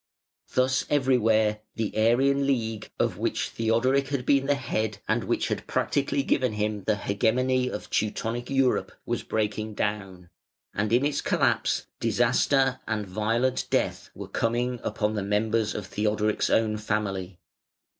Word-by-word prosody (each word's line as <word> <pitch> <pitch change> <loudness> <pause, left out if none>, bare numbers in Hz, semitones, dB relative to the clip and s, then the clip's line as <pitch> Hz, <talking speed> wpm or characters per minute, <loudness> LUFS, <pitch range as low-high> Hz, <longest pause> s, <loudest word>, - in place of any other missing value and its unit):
Thus 130 0 +2
everywhere 115 -6 +3 0.2
the 110 -2 -3
Arian 135 +5 +3
League, 115 -5 -1
of - - 0
which - - -1
Theodoric 130 +5 +1
had 135 -3 -2
been 135 -1 +3
the 145 - +3
head, 110 -6 -2
and - - 0
which - - 0
had - - -3
practically 140 0 0
given 130 -4 +1
him 105 -2 -2
the 110 - +2
hegemony 125 +6 +1
of 105 - -6
Teutonic 115 +3 -1
Europe, 135 -2 +1
was - - -2
breaking 110 0 -2
down; 95 -5 -3 0.4
and 105 +1 -1
in 125 +4 +3
its 145 -1 0
collapse - - +1
disaster 135 -2 +2
and 110 -2 -1
violent 115 +6 0
death - - -1
were - - -7
coming 120 +2 -1
upon 105 0 -1
the 105 - -1
members 105 +2 0
of 105 - -4
Theodoric's 105 +1 0
own 110 -1 +2
family. 100 -4 -2
110 Hz, 145 wpm, -26 LUFS, 105-130 Hz, 0.4 s, everywhere